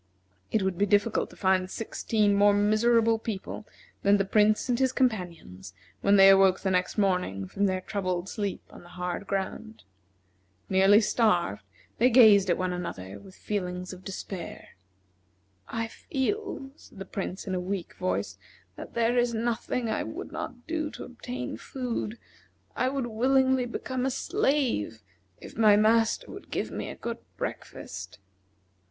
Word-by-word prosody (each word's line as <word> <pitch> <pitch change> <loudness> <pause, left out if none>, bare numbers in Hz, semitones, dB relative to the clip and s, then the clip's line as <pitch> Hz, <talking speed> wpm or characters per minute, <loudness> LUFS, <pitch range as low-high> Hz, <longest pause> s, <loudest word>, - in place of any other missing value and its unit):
It 215 - +2
would 190 -2 -1
be 205 - +3
difficult 205 +3 +2
to - - -15
find 185 -1 +1
sixteen 215 -1 0
more 205 0 +5
miserable 225 +2 +3
people 215 -1 -6 0.3
than 200 +1 +4
the 195 - 0
Prince 210 +3 +3
and 245 -1 +1
his 260 -1 +3
companions 170 - -2 0.3
when 200 - +4
they 195 -1 +8
awoke 195 -1 +5
the 190 - 0
next 180 +2 0
morning 180 - 0
from 200 - 0
their 185 -1 -1
troubled 185 -2 -2
sleep 200 -1 -3
on - - -12
the 175 - -15
hard 180 +2 -3
ground. 200 +3 -4 0.9
Nearly 195 +3 +6
starved, 180 - +1 0.4
they 245 +3 +5
gazed 215 -6 +7
at 175 - +3
one 185 -1 -1
another 100 - -6
with 185 - -15
feelings 180 -3 -4
of 185 0 -12
despair. 190 -1 -7 1.0
"I 230 0 -2
feel," 270 - -3
said - - -18
the 195 - -6
Prince, 190 -1 -5
in 190 - -3
a 185 - 0
weak 180 -1 -4
voice, 95 +1 -2 0.4
"that - - -9
there 235 +1 +2
is 240 -1 +1
nothing 235 +1 -1
I 220 - -1
would - - -6
not 245 -1 -6
do 315 -2 -2
to - - -9
obtain 125 - -6
food. 240 - -4 0.6
I 255 - +1
would 270 -2 -2
willingly 260 +2 +2
become 255 +2 -3
a - - +1
slave 270 - 0 0.4
if - - -11
my 215 -2 +6
master 220 +1 +2
would - - -11
give - - -3
me - - -4
a - - -7
good - - -5 0.2
breakfast." - - -6
205 Hz, 160 wpm, -28 LUFS, 185-235 Hz, 1.0 s, they